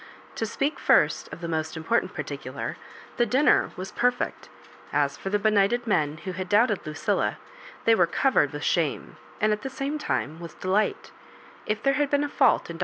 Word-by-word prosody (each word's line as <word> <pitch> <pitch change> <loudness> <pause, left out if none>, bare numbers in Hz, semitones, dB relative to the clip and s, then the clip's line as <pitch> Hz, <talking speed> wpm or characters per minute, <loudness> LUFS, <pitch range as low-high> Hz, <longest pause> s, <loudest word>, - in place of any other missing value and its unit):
To 225 - -1
speak 275 +7 -2
first - - +3
of - - -9
the 170 - -4
most 160 0 -2
important 165 +9 0
particular, - - -5 0.4
the 240 - +3
dinner 265 +7 +3
was 185 +1 -6
perfect. 245 0 -1 0.4
As - - +1
for 195 - -5
the 205 - +2
benighted 215 +3 +2
men 155 -8 +1
who 190 - -2
had 185 0 -5
doubted 210 -4 +2
Lucilla, 155 0 -1 0.5
they 230 - +6
were 180 -6 +4
covered 170 - +2
with 145 -1 -6
shame, 165 -5 -1 0.2
and 215 0 +3
at 210 - -4
the 270 - -4
same 275 +3 -3
time, 160 - -2
with 170 -1 -10
delight 195 +3 0 0.6
If 215 0 -2
there 275 - +3
had 290 0 +1
been 285 0 +2
a 290 - -2
fault - - +3
in 165 - -7
Br. - - -16
210 Hz, 190 wpm, -26 LUFS, 170-245 Hz, 0.6 s, they